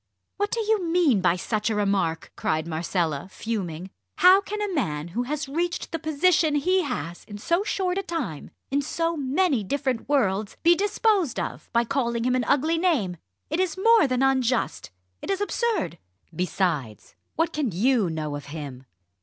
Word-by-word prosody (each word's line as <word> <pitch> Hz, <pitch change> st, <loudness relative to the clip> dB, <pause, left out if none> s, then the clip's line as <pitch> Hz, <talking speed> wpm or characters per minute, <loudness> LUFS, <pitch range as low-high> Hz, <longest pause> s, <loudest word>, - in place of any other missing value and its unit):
"What 410 Hz, +1 st, 0 dB
do 465 Hz, -, -2 dB
you 430 Hz, -3 st, +1 dB
mean 330 Hz, -, +3 dB
by 175 Hz, -1 st, +3 dB
such 210 Hz, +4 st, -1 dB
a 220 Hz, -, 0 dB
remark," 195 Hz, -5 st, 0 dB
cried 155 Hz, 0 st, -1 dB
Marcella, 165 Hz, -1 st, -2 dB
fuming. 190 Hz, -5 st, -4 dB, 0.3 s
"How 370 Hz, +2 st, +7 dB
can 420 Hz, +1 st, -5 dB
a 415 Hz, -2 st, -2 dB
man 155 Hz, -, -2 dB
who 225 Hz, +8 st, -2 dB
has 300 Hz, -1 st, -2 dB
reached 340 Hz, +5 st, -2 dB
the 330 Hz, -, -2 dB
position 315 Hz, 0 st, +2 dB
he 370 Hz, +6 st, +2 dB
has 210 Hz, -, -4 dB
in 205 Hz, -, -8 dB
so 340 Hz, -, 0 dB
short 380 Hz, -2 st, -1 dB
a -, -, 0 dB
time 320 Hz, -, -4 dB, 0.2 s
in 280 Hz, +1 st, +2 dB
so 330 Hz, +3 st, -1 dB
many 280 Hz, -, +1 dB
different 260 Hz, +2 st, -2 dB
worlds 210 Hz, -7 st, +1 dB
be 340 Hz, +1 st, +7 dB
disposed 400 Hz, -, +1 dB
of -, -, -5 dB
by 235 Hz, 0 st, +3 dB
calling 235 Hz, -2 st, -1 dB
him 250 Hz, +1 st, +2 dB
an 255 Hz, -2 st, +1 dB
ugly 315 Hz, +4 st, +2 dB
name? 260 Hz, -, +1 dB, 0.3 s
It 315 Hz, -, 0 dB
is 370 Hz, -3 st, 0 dB
more 450 Hz, -3 st, +5 dB
than 255 Hz, 0 st, +1 dB
unjust 260 Hz, -2 st, +1 dB, 0.3 s
it -, -, -7 dB
is 390 Hz, -1 st, 0 dB
absurd! 410 Hz, -, -1 dB, 0.4 s
Besides, 160 Hz, -, -2 dB, 0.2 s
what 330 Hz, +1 st, 0 dB
can 295 Hz, -5 st, 0 dB
you 215 Hz, +1 st, +2 dB
know 155 Hz, -2 st, -3 dB
of 145 Hz, -, -7 dB
him?" 140 Hz, -4 st, -8 dB
270 Hz, 175 wpm, -25 LUFS, -, 0.4 s, How